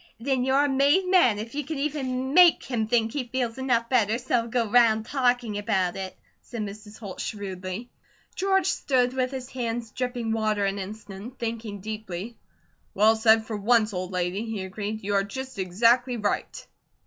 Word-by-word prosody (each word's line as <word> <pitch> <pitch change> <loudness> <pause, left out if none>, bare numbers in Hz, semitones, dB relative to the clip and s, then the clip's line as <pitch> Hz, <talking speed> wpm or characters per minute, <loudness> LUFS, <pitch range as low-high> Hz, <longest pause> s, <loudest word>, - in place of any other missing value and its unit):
"Then 260 +1 0
you're 270 +2 +3
a - - +2
made 285 +7 +3
man 345 - +4
if 220 +2 -6
you 295 +1 -2
can 305 +2 -5
even 270 -2 -2
make 355 0 +7
him 230 -4 -2
think 225 -1 +1
he 280 -4 -2
feels 245 -1 -2
enough 240 -3 +1
better 230 -3 +2
so's 245 +1 -13
he'll 235 -2 +2
go 235 -1 0
round 220 -1 +4
talking 245 -5 0
about 190 -3 0
it," 190 -1 -6 0.2
said 235 -3 -7
Mrs. 210 +1 -9
Holt, 200 -5 -7
shrewdly. 195 +2 -5 0.4
George 385 -1 +1
stood 255 -7 +1
with 255 -1 0
his 260 -1 -6
hands 235 -2 -3
dripping 245 -2 -3
water 215 -2 +1
an 195 0 -1
instant, 210 +4 -8
thinking 225 -3 -4
deeply. 215 0 -6 0.6
"Well 215 +3 +5
said 220 0 +4
for 220 -1 -4
once, 215 +1 +2
old 185 0 -4
lady," 180 +3 -1
he 220 -4 -4
agreed. 205 +3 -5
"You 205 +1 -2
are 195 0 +3
just 260 +3 -7
exactly 235 +7 +2
right." 210 -2 -2
230 Hz, 180 wpm, -26 LUFS, 205-255 Hz, 0.6 s, make